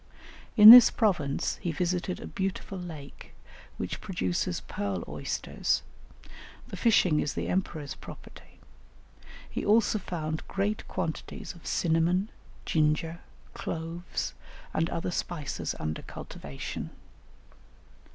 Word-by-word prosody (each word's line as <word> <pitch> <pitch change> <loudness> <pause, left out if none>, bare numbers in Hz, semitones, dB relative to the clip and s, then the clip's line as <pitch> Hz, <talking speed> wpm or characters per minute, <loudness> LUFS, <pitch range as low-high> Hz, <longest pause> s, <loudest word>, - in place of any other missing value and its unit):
In 215 +1 +13
this 245 0 +12
province 175 - 0
he 175 - -3
visited 180 +2 -1
a - - -7
beautiful 195 0 -4
lake 155 -6 -10 0.4
which - - -4
produces 90 -1 -2
pearl 100 -4 -3
oysters; - - -2 0.9
the - - -6
fishing 180 -9 +3
is 145 - -2
the - - -2
emperor's 160 -6 -2
property; - - -13 0.9
he - - -4
also 215 0 +3
found 155 -4 -4
great 205 +2 -2
quantities 160 - -4
of 170 - -13
cinnamon, 175 +4 +1 0.3
ginger, 160 +2 +1 0.3
cloves, 165 +1 -4 0.4
and 165 +1 +1
other 170 +2 -2
spices 165 -4 -3
under 75 0 -3
cultivation. 70 -1 -7
170 Hz, 105 wpm, -28 LUFS, 150-190 Hz, 0.9 s, In